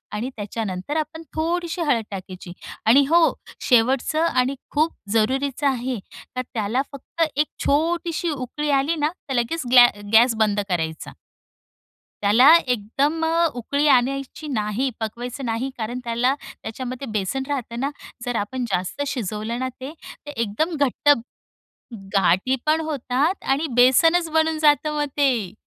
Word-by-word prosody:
आणि 235 Hz, +5 st, -3 dB
त्याच्यानंतर 205 Hz, +4 st, -4 dB
आपण 315 Hz, +1 st, -4 dB
थोडीशी 340 Hz, +2 st, -1 dB
हळद 265 Hz, -8 st, +1 dB
टाकायची. 185 Hz, -2 st, -8 dB, 0.3 s
आणि 260 Hz, +6 st, +6 dB
हो, 335 Hz, 0 st, +5 dB, 0.4 s
शेवटचं 260 Hz, +6 st, +3 dB
आणि 260 Hz, -3 st, +1 dB, 0.2 s
खूप 310 Hz, +3 st, +1 dB, 0.2 s
जरूरीचं 270 Hz, +5 st, +1 dB
आहे, 255 Hz, -3 st, -1 dB, 0.4 s
तर 255 Hz, -, 0 dB
त्याला 225 Hz, +3 st, 0 dB
फक्त 280 Hz, +4 st, -8 dB
एक 300 Hz, +2 st, +3 dB, 0.2 s
छोटीशी 335 Hz, +3 st, 0 dB
उकळी 290 Hz, +2 st, -4 dB
आली 300 Hz, +5 st, 0 dB
ना, 300 Hz, 0 st, +1 dB, 0.2 s
तर 270 Hz, -, -1 dB
लगेच 255 Hz, +7 st, 0 dB
ग्लॅ 245 Hz, -1 st, +9 dB, 0.3 s
गॅस 230 Hz, +1 st, +6 dB
बंद 210 Hz, -1 st, +2 dB
करायचा. 160 Hz, -3 st, -3 dB, 1.1 s
त्याला 240 Hz, +9 st, +7 dB
एकदम 270 Hz, +8 st, 0 dB, 0.3 s
उकळी 280 Hz, +5 st, -1 dB
आणायची 275 Hz, +3 st, +1 dB
नाही, 230 Hz, 0 st, -1 dB
पकवायचं 245 Hz, +4 st, -5 dB
नाही, 230 Hz, +3 st, -2 dB
कारण 240 Hz, +3 st, -4 dB
त्याला 240 Hz, +2 st, +1 dB, 0.3 s
त्याच्यामध्ये 255 Hz, +3 st, -6 dB
बेसन 215 Hz, +6 st, -2 dB
राहत 265 Hz, -5 st, -3 dB
ना. 275 Hz, +2 st, 0 dB, 0.4 s
जर 245 Hz, -1 st, -2 dB
आपण 240 Hz, +4 st, -2 dB
जास्त 185 Hz, +10 st, -2 dB
शिजवलं 225 Hz, -1 st, -3 dB
ना, 260 Hz, -, -2 dB
ते 280 Hz, +4 st, -6 dB, 0.4 s
एकदम 230 Hz, -, -1 dB
घट्ट 285 Hz, +1 st, +1 dB, 1.0 s
गाठी 195 Hz, +6 st, +3 dB
पण 315 Hz, +1 st, +2 dB
होतात 285 Hz, +5 st, -1 dB
आणि 295 Hz, +4 st, +1 dB
बेसनच 325 Hz, +8 st, +5 dB
बनून 320 Hz, 0 st, +1 dB
जातं, 300 Hz, 0 st, +3 dB
मग 295 Hz, 0 st, 0 dB
ते. 245 Hz, -10 st, +1 dB
260 Hz, 135 wpm, -22 LUFS, 225-295 Hz, 1.1 s, ग्लॅ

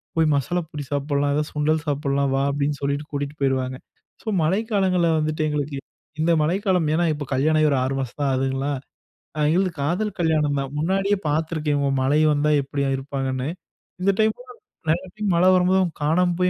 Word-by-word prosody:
"போய் 160 Hz, -1 st, +3 dB
மசாலா 175 Hz, +6 st, 0 dB
பொரி 150 Hz, -1 st, -5 dB
சாப்பிடலாம், 145 Hz, 0 st, 0 dB
ஏதாவது 150 Hz, 0 st, -1 dB
சுண்டல் 150 Hz, +1 st, +1 dB
சாப்பிடலாம். 140 Hz, -1 st, 0 dB
வா." 135 Hz, -, +1 dB
அப்படின்னு 145 Hz, +1 st, -1 dB
சொல்லிட்டு 140 Hz, +1 st, -1 dB
கூட்டிட்டு 145 Hz, 0 st, -3 dB
போயிருவாங்க. 130 Hz, -1 st, 0 dB, 0.5 s
ஸோ, -, -, -19 dB, 0.2 s
மழைக்காலங்கள்ல 190 Hz, -1 st, +1 dB
வந்துட்டு 155 Hz, 0 st, -1 dB
எங்களுக்கு 145 Hz, -1 st, -2 dB, 0.4 s
இந்த 165 Hz, +2 st, +3 dB
மழைக்காலம் 180 Hz, +1 st, +1 dB
ஏன்னா, 170 Hz, +2 st, +2 dB
இப்போ 145 Hz, -1 st, -5 dB
கல்யாணம் 155 Hz, +4 st, +2 dB
ஆகி 155 Hz, -, +4 dB
ஒரு 140 Hz, -, +2 dB
6 130 Hz, +1 st, -1 dB
மாசம் 130 Hz, +1 st, -5 dB
தான் 140 Hz, -1 st, +2 dB
ஆகுதுங்களா. 135 Hz, +2 st, -1 dB, 0.8 s
எங்களுது 185 Hz, +4 st, +2 dB
காதல் 185 Hz, +8 st, -1 dB
கல்யாணம் 155 Hz, -3 st, +2 dB
தான். 135 Hz, -1 st, -4 dB
முன்னாடியே 195 Hz, +5 st, +1 dB
பார்த்துருக்கேன். 155 Hz, -1 st, 0 dB
இவங்க 140 Hz, -1 st, +1 dB
மழை 140 Hz, +3 st, +2 dB
வந்தா 150 Hz, +1 st, +1 dB
எப்பிடி 140 Hz, +1 st, -2 dB
இருப்பாங்கன்னு. 135 Hz, -1 st, -3 dB, 0.5 s
இந்த 195 Hz, +2 st, +4 dB
டைம்லா 220 Hz, +3 st, +1 dB, 0.4 s
நிறைய 175 Hz, +4 st, +1 dB
டைம் 210 Hz, -2 st, -1 dB
மழை 180 Hz, +2 st, +4 dB
வரும்போது, 185 Hz, +1 st, +3 dB
அவங்க 175 Hz, -3 st, -1 dB
காணாம 175 Hz, +4 st, +2 dB
போய், 180 Hz, 0 st, +3 dB
150 Hz, 170 wpm, -23 LUFS, 140-175 Hz, 0.8 s, ஆகி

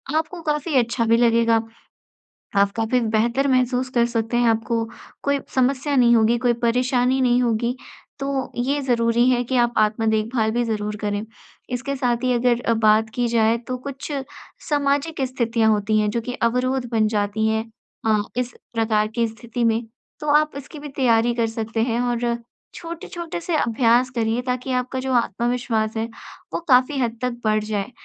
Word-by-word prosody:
आपको 320 Hz, +2 st, -2 dB
काफ़ी 300 Hz, 0 st, -2 dB
अच्छा 235 Hz, -1 st, +1 dB
भी 230 Hz, +1 st, +4 dB
लगेगा। 230 Hz, -1 st, +3 dB, 0.9 s
आप 200 Hz, 0 st, +4 dB
काफ़ी 225 Hz, +2 st, +1 dB
बेहतर 235 Hz, +4 st, +1 dB
महसूस 255 Hz, -1 st, +1 dB
कर 235 Hz, -1 st, +4 dB
सकते 235 Hz, 0 st, -1 dB
हैं, 240 Hz, -, +3 dB
आपको 225 Hz, 0 st, 0 dB, 0.4 s
कोई 280 Hz, 0 st, +1 dB, 0.2 s
समस्या 270 Hz, +2 st, +1 dB
नहीं 240 Hz, -2 st, +5 dB
होगी, 230 Hz, +1 st, +3 dB
कोई 245 Hz, 0 st, +2 dB
परेशानी 250 Hz, +2 st, +2 dB
नहीं 245 Hz, -1 st, +3 dB
होगी 235 Hz, +1 st, 0 dB, 0.4 s
तो 275 Hz, -1 st, -2 dB
ये 280 Hz, +3 st, 0 dB
ज़रूरी 235 Hz, -1 st, +2 dB
है 245 Hz, -1 st, +2 dB
कि 255 Hz, +2 st, -1 dB
आप 240 Hz, 0 st, -1 dB
आत्म-देखभाल 220 Hz, +1 st, +1 dB
भी 240 Hz, +2 st, 0 dB
ज़रूर 210 Hz, -2 st, -2 dB
करें। 205 Hz, +1 st, -2 dB, 0.4 s
इसके 255 Hz, +3 st, -3 dB
साथ 245 Hz, -2 st, 0 dB
ही 255 Hz, 0 st, +2 dB
अगर 240 Hz, 0 st, +2 dB
अ, 230 Hz, -, +1 dB
बात 220 Hz, 0 st, +3 dB
की 245 Hz, -1 st, +1 dB
जाए 230 Hz, -1 st, +2 dB
तो 255 Hz, -, -2 dB
कुछ 275 Hz, +3 st, -7 dB, 0.6 s
सामाजिक 285 Hz, +1 st, 0 dB
स्थितियाँ 230 Hz, -3 st, +1 dB
होती 215 Hz, +1 st, +1 dB
हैं 210 Hz, -, +1 dB
जो 235 Hz, -, -1 dB
कि 245 Hz, +2 st, -5 dB, 0.2 s
अवरोध 250 Hz, +1 st, -1 dB
बन 220 Hz, -2 st, +2 dB
जाती 210 Hz, 0 st, 0 dB
हैं 220 Hz, 0 st, 0 dB, 0.4 s
अ, 215 Hz, -1 st, +3 dB, 0.2 s
इस 250 Hz, 0 st, -1 dB, 0.2 s
प्रकार 220 Hz, -2 st, +1 dB
की 235 Hz, -1 st, +2 dB
स्थिति 230 Hz, +2 st, -5 dB
में 230 Hz, 0 st, +2 dB, 0.4 s
तो 300 Hz, -, -6 dB
आप 305 Hz, 0 st, -4 dB
इसकी 290 Hz, +2 st, -9 dB
भी 295 Hz, 0 st, -8 dB
तैयारी 240 Hz, -4 st, +2 dB
कर 230 Hz, -1 st, +1 dB
सकते 225 Hz, 0 st, -3 dB
हैं 235 Hz, 0 st, 0 dB
और 240 Hz, -1 st, 0 dB, 0.4 s
छोटे-छोटे 335 Hz, 0 st, -6 dB
से 335 Hz, -1 st, -1 dB
अभ्यास 235 Hz, 0 st, +3 dB
करिए 230 Hz, +1 st, 0 dB
ताकि 250 Hz, +1 st, -2 dB
आपका 255 Hz, +1 st, -4 dB
जो 260 Hz, 0 st, -2 dB
आत्मविश्वास 235 Hz, -1 st, 0 dB
है 220 Hz, -, 0 dB, 0.5 s
वो -, -, 0 dB
काफ़ी 255 Hz, +2 st, +4 dB
हद 235 Hz, -2 st, -1 dB
तक 250 Hz, -1 st, -1 dB
बढ़ 215 Hz, 0 st, +2 dB
जाए। 210 Hz, +1 st, -3 dB
240 Hz, 175 wpm, -22 LUFS, 225-255 Hz, 0.9 s, नहीं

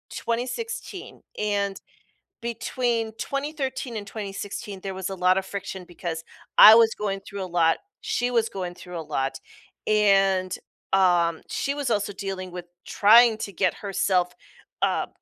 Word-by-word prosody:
2016 260 Hz, -, -4 dB, 0.2 s
and 200 Hz, -2 st, -1 dB, 0.6 s
between 235 Hz, 0 st, -1 dB
2013 275 Hz, -2 st, -3 dB
and 205 Hz, -, -6 dB
2016, 200 Hz, -1 st, -6 dB
there 195 Hz, 0 st, -4 dB
was 190 Hz, 0 st, -4 dB
a 195 Hz, -, -4 dB
lotta 185 Hz, +1 st, +3 dB
friction 190 Hz, -1 st, -6 dB
because 170 Hz, -2 st, -5 dB, 0.4 s
I 215 Hz, -, +12 dB
was 225 Hz, -1 st, +5 dB
going 195 Hz, -2 st, -3 dB
through 200 Hz, 0 st, -7 dB
a -, -, -5 dB
lot, 165 Hz, -2 st, +2 dB, 0.2 s
she 245 Hz, -, -1 dB
was 230 Hz, -2 st, +2 dB
going 180 Hz, -2 st, -5 dB
through 180 Hz, -1 st, -8 dB
a -, -, -3 dB
lot, 140 Hz, -3 st, -2 dB, 0.5 s
and, 195 Hz, -3 st, +3 dB, 0.4 s
um, 175 Hz, -3 st, +3 dB
she 280 Hz, -, -1 dB
was 285 Hz, -3 st, -2 dB
also 205 Hz, -2 st, 0 dB
dealing 190 Hz, -2 st, -5 dB
with 175 Hz, 0 st, -7 dB, 0.2 s
trying 225 Hz, +2 st, +6 dB
to 200 Hz, -, -4 dB
get 185 Hz, 0 st, +1 dB
herself, 185 Hz, -3 st, 0 dB, 0.5 s
uh, -, -, +1 dB
200 Hz, 140 wpm, -25 LUFS, 185-230 Hz, 0.6 s, I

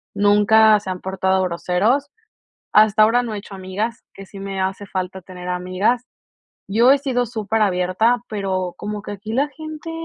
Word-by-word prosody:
Nunca 210 Hz, +1 st, +5 dB
se 195 Hz, -, -8 dB
han 185 Hz, -1 st, -4 dB
portado 190 Hz, 0 st, 0 dB
groseros. 185 Hz, +10 st, 0 dB, 0.6 s
Hasta 215 Hz, 0 st, +6 dB
ahora 235 Hz, +3 st, +3 dB
no 230 Hz, -3 st, -4 dB
he -, -, -4 dB
hecho 200 Hz, 0 st, -11 dB
amigas, 200 Hz, +5 st, -4 dB
que 195 Hz, -, -11 dB
sí 195 Hz, +1 st, -12 dB
me 195 Hz, -1 st, -4 dB
hace 190 Hz, +2 st, -3 dB
falta 190 Hz, -1 st, -4 dB
tener 180 Hz, 0 st, -10 dB
amigas. 185 Hz, +7 st, 0 dB, 0.6 s
Yo 230 Hz, +6 st, +4 dB
he 280 Hz, -, +6 dB
sido 255 Hz, -3 st, -1 dB
súper 220 Hz, -1 st, -2 dB
abierta, 195 Hz, +5 st, +2 dB
pero 190 Hz, -4 st, -2 dB
como 210 Hz, 0 st, -5 dB
que -, -, -7 dB
aquí 205 Hz, +2 st, -6 dB
la 280 Hz, +4 st, +1 dB
gente, 310 Hz, +1 st, -8 dB
205 Hz, 175 wpm, -20 LUFS, 190-225 Hz, 0.6 s, Hasta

